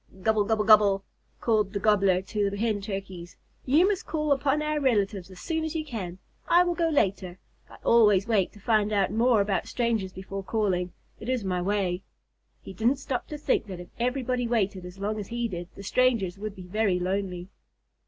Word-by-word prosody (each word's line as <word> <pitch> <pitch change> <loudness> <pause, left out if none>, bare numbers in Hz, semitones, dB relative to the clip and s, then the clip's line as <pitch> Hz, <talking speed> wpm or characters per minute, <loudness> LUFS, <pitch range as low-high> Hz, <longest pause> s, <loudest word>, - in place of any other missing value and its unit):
"Gobble 220 -1 +2
gobble 220 0 +1
gobble," 205 -3 +5 0.4
called 215 -3 +1
the 200 - -1
Gobbler 195 -3 +3
to 205 +1 -1
the 200 - -6
Hen 215 -1 0
Turkeys. 190 -3 -7 0.3
"You 310 +8 +5
must 400 -2 -1
call 305 -2 -1
upon 280 +2 +2
our 305 0 0
relatives 205 -8 0
as 185 -1 -12
soon 320 -1 -2
as 315 +1 -4
you 310 -1 -2
can. 195 - -5 0.3
I 350 +1 +6
will 350 -1 0
go 335 -1 +1
later. 190 - 0 0.3
I - - -13
always 210 -4 +4
wait 210 -5 +2
to 210 - -15
find 215 0 +1
out 200 -3 +1
more 230 0 +3
about 200 -3 -1
strangers 230 -6 -1
before 195 +1 -6
calling. 190 -4 -1 0.3
It 220 - -6
is 255 -4 0
my 180 -2 -1
way." 185 -1 0 0.6
He - - -9
didn't 230 +8 +2
stop 260 -2 -4
to 300 - -6
think 295 - 0
that 185 -3 -7
if 175 - -10
everybody 250 0 -1
waited 200 -5 -1
as 180 +1 -10
long 210 +2 -2
as 200 - -6
he 235 0 -2
did, 175 -4 -6
the 200 - -9
strangers 205 -5 +1
would 210 -1 -5
be 185 - -10
very 200 0 +1
lonely. 185 0 -3
210 Hz, 200 wpm, -27 LUFS, 190-240 Hz, 0.6 s, I